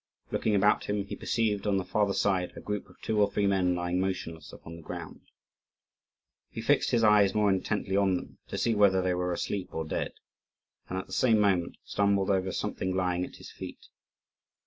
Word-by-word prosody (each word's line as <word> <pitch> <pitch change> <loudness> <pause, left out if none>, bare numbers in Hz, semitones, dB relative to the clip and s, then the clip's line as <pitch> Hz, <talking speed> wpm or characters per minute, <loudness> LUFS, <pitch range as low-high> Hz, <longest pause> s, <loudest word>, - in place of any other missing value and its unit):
Looking 110 - +1
about 105 +1 +3
him, 105 -1 -1
he - - -6
perceived, 105 -3 -1
on 100 -1 +2
the 95 - -2
farther 105 -2 +1
side, 95 -3 +1
a - - -7
group 105 -1 -4
of 90 - -20
two 110 -1 +1
or 100 - +4
three 100 - +1
men 95 -2 +2
lying 90 +1 -1
motionless 85 -4 -4
upon 80 - -10
the - - -11
ground. - - -8 1.3
He - - -7
fixed - - +2
his 115 -1 +2
eyes 105 -2 +5
more 105 -1 +3
intently 95 +1 -1
on 100 -2 +3
them, - - -7
to - - -5
see 115 - +1
whether 100 -3 +4
they 90 0 +1
were 90 0 -1
asleep 95 +2 -3
or 80 - -2
dead; 75 - -3 0.8
and, 95 - -3
at 95 - -3
the - - -11
same 115 -4 +4
moment, 95 -4 +2
stumbled 100 -1 +1
over 95 -1 +1
something 95 0 -2
lying 90 -1 0
at - - -7
his - - -11
feet. - - -10
95 Hz, 200 wpm, -29 LUFS, 90-105 Hz, 1.3 s, eyes